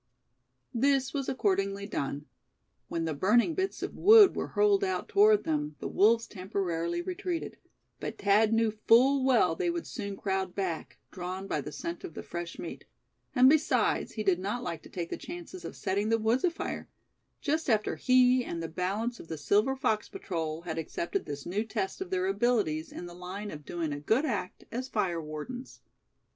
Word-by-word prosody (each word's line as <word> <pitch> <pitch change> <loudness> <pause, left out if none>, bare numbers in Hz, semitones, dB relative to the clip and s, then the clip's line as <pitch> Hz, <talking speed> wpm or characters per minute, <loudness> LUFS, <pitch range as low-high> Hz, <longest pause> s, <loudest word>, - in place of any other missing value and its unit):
This 270 +2 +2
was 275 -3 -2
accordingly 195 -4 0
done. 145 -6 -3 0.6
When 165 -1 -2
the 160 - -1
burning 220 - +3
bits 380 +3 -2
of - - -3
wood 425 -1 +8
were - - -2
hurled 410 -1 +3
out 375 -1 -1
toward 420 +1 +5
them, 150 -1 -1
the - - -5
wolves 225 +3 +4
temporarily 175 -4 -2
retreated; 330 - -4 0.4
but - - -5
Thad 210 +2 +4
knew 225 -1 +3
full 250 +6 +4
well 260 -3 +4
they 365 -2 0
would 340 -1 -2
soon 200 -4 -5
crowd 190 -2 -2
back, 185 -5 -3
drawn 185 +1 -5
by 155 -6 -1
the 150 - -7
scent 170 +4 -5
of 160 - -8
the - - -6
fresh 175 0 -6
meat; - - -7 0.5
and 255 0 +7
besides, 305 +2 +2
he 215 - -3
did 190 -3 +2
not 205 +6 -3
like 170 -2 -4
to - - -14
take 170 -2 -5
the - - -2
chances 350 +2 -8
of - - -7
setting 200 +3 -1
the 225 - +4
woods 225 +3 +1
afire; 345 -2 -2 0.5
just 310 0 -1
after 215 -2 +2
he, 255 0 +4
and 170 -6 -4
the - - -2
balance 200 +8 -2
of - - -11
the 160 - -5
Silver 210 - +2
Fox 235 -5 0
Patrol, 160 -3 -4
had 165 -2 -3
accepted 345 - -3
this 145 -1 -6
new 195 +5 -1
test 205 - -3
of 380 - -4
their 375 0 0
abilities 225 - +1
in - - -7
the 175 - -9
line 185 +4 -6
of 150 -1 -9
doing 165 -4 -3
a 145 - -4
good 220 - +2
act 205 -9 -3
as 255 +3 -3
fire 185 -8 0
wardens. 155 - -7
210 Hz, 185 wpm, -30 LUFS, 175-260 Hz, 0.6 s, wood